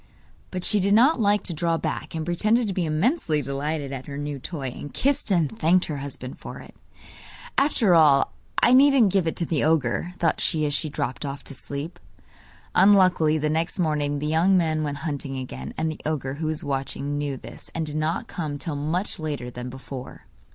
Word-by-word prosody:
But 185 -1 -4
she 210 +1 +4
did 200 +2 +3
not 260 +6 +5
like 205 -1 +2
to 175 - -1
draw 165 +1 0
back, - - -4
and 160 -1 -3
pretended 215 +7 +2
to 195 - -2
be 180 -3 -1
immensely 160 - +1
delighted 140 +1 -3
at 130 -1 -7
her 140 -1 -6
new 145 -1 -4
toy, 140 -2 -5
and 145 +3 -8
kissed 280 -3 +1
and 160 - +1
thanked 170 +9 +3
her 150 - -4
husband 135 -2 -7
for - - -8
it. - - -12 0.8
'After 255 -9 +3
all 150 -4 +5 0.3
I 245 - +6
needn't 260 -6 +6
give 190 -4 +2
it 160 - -1
to 170 - 0
the 155 -3 0
ogre,' 160 +3 +1
thought 165 -3 +1
she 155 -2 +1
as 145 - 0
she 155 +2 +1
dropped 140 -2 -3
off 140 -1 -5
to - - -7
sleep. 145 +6 -6 0.7
Unluckily 185 -5 +5
the 155 0 0
next 165 +5 -1
morning 150 -4 0
the 145 - -3
young 165 +5 +3
man 160 -3 +1
went 145 -2 -2
hunting 140 -3 -3
again, 70 - -6
and 160 - 0
the 155 - -9
ogre, 145 -4 -2
who 155 +3 -3
was 155 -1 -1
watching, 140 +1 -3
knew 145 -2 -2
this, - - -12
and 165 -1 -1
did 150 -1 -5
not 155 +2 -1
come 150 -4 -4
till 145 +2 -3
much 160 +8 -2
later 145 -6 -4
than 125 +1 -6
before. 130 0 -9
155 Hz, 205 wpm, -25 LUFS, 140-180 Hz, 0.8 s, I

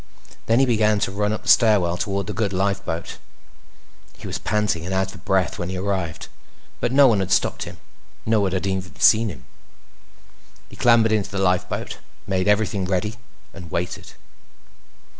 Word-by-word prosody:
Then 115 - +3
he 135 - +5
began 110 -3 +2
to - - 0
run 105 +1 -1
up 110 - -4
the - - -13
stairwell 100 -7 +4
toward 100 +1 -2
the - - -5
good 100 0 -1
lifeboat. 95 -3 -2 1.0
He - - -12
was - - -4
panting 105 -6 -1
and 95 +2 -3
out 95 0 -1
of 95 -1 -14
breath 95 -2 0
when 85 - -3
he 95 - -4
arrived, 95 -4 -3 0.5
but - - -1
no 140 +2 +6
one 115 -6 +4
had 95 -1 -2
stopped - - +1
him. - - -10 0.5
No 110 -1 +2
one 95 -2 0
had 95 +1 -2
even 95 -4 -4
seen 110 0 +5
him. 65 -9 -10 1.2
He - - -13
clambered 115 -2 +4
into 105 -2 0
the 100 - -5
lifeboat, 90 -2 -1 0.3
made 95 -1 -1
everything 105 -2 +1
ready, 95 +4 -2 0.4
and 90 -3 -10
waited. 90 +2 -4
100 Hz, 175 wpm, -22 LUFS, 95-110 Hz, 1.2 s, no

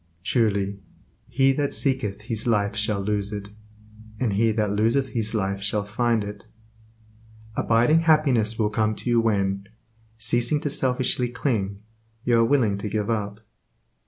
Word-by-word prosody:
Truly, 100 -3 0 0.5
"He 135 +2 +3
that 145 +1 -1
seeketh 130 -8 0
his 110 +1 -4
life 105 -3 +1
shall 105 -1 0
lose 100 0 -2
it, 100 -1 -6 0.7
and 115 -6 0
he 110 +3 +2
that 105 -2 0
loseth 120 +6 +1
his 110 -1 -2
life 100 -1 -1
shall 105 +1 -1
find 115 +1 0
it." 105 +2 -9 1.1
Abiding 120 +10 +3
happiness 140 -9 +3
will 105 -2 0
come 110 0 0
to 120 - -5
you 120 -1 +4
when, 100 -3 0 0.5
ceasing 120 +6 +2
to 145 - -2
selfishly 125 -2 +1
cling, 105 -6 -2 0.4
you 120 -2 +3
are - - +5
willing 115 -6 +2
to 105 - -4
give 105 +2 -1
up. 105 -1 -3
110 Hz, 150 wpm, -24 LUFS, 105-120 Hz, 1.1 s, are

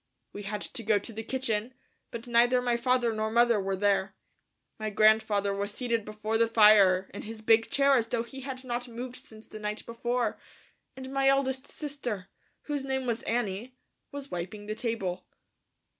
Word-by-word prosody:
We 205 - -6
had 205 +1 -4
to 235 - -5
go 215 -1 +3
to 205 +3 -6
the 220 - -5
kitchen, 235 -1 -2 0.3
but 235 -1 -7
neither 240 +1 +4
my 245 -1 +1
father 240 -1 +2
nor 215 0 -1
mother 235 -1 +4
were 195 0 -1
there. 195 0 +1 0.6
My 215 0 -2
grandfather 215 -1 +3
was 200 +1 -3
seated 230 -1 -1
before 215 +1 -2
the 230 - +4
fire 210 -4 +6
in 200 - -6
his 220 0 -9
big 225 0 +4
chair 280 0 +4
as 230 -3 +2
though 230 0 -1
he 265 +3 -10
had 265 -1 -6
not 245 0 -3
moved 245 +2 -8
since 220 0 -14
the 215 - -10
night 210 0 -4
before, 240 0 -2 0.6
and 265 0 -7
my 270 0 +2
eldest 270 -1 +2
sister, 250 - -5 0.3
whose 290 -2 -3
name 265 -1 -2
was 235 -1 -1
Annie, 230 +1 -2 0.4
was 280 -1 -8
wiping 190 +4 -5
the 215 - -3
table. 215 -6 -3
230 Hz, 180 wpm, -29 LUFS, 210-250 Hz, 0.6 s, fire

